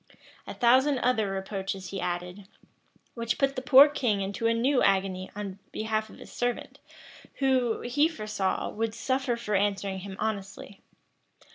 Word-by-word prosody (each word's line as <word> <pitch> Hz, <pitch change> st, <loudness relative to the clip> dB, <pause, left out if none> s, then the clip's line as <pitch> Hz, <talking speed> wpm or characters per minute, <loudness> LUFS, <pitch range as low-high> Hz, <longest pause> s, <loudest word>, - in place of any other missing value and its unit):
A -, -, -6 dB
thousand 260 Hz, +4 st, +4 dB
other 240 Hz, -5 st, +1 dB
reproaches 195 Hz, -1 st, -4 dB
he 195 Hz, -, -4 dB
added, 180 Hz, +2 st, -4 dB, 0.7 s
which 230 Hz, -1 st, -2 dB
put 275 Hz, 0 st, +1 dB
the 255 Hz, -, -3 dB
poor 265 Hz, +2 st, +8 dB
king 245 Hz, -9 st, 0 dB
into 200 Hz, +3 st, -2 dB
a 230 Hz, -, +3 dB
new 255 Hz, +3 st, +2 dB
agony 190 Hz, -1 st, +1 dB
in 200 Hz, -2 st, -6 dB
behalf 220 Hz, 0 st, -2 dB
of -, -, -14 dB
a -, -, -10 dB
servant, 245 Hz, 0 st, -3 dB, 0.6 s
who, 260 Hz, -4 st, +1 dB
he 290 Hz, +6 st, +2 dB
foresaw, 215 Hz, -, -2 dB
would 225 Hz, 0 st, -3 dB
suffer 260 Hz, 0 st, -1 dB
for 210 Hz, -3 st, -4 dB
answering 195 Hz, -1 st, 0 dB
him 190 Hz, 0 st, -8 dB
honestly. 200 Hz, -2 st, -5 dB
215 Hz, 150 wpm, -28 LUFS, 195-250 Hz, 0.7 s, poor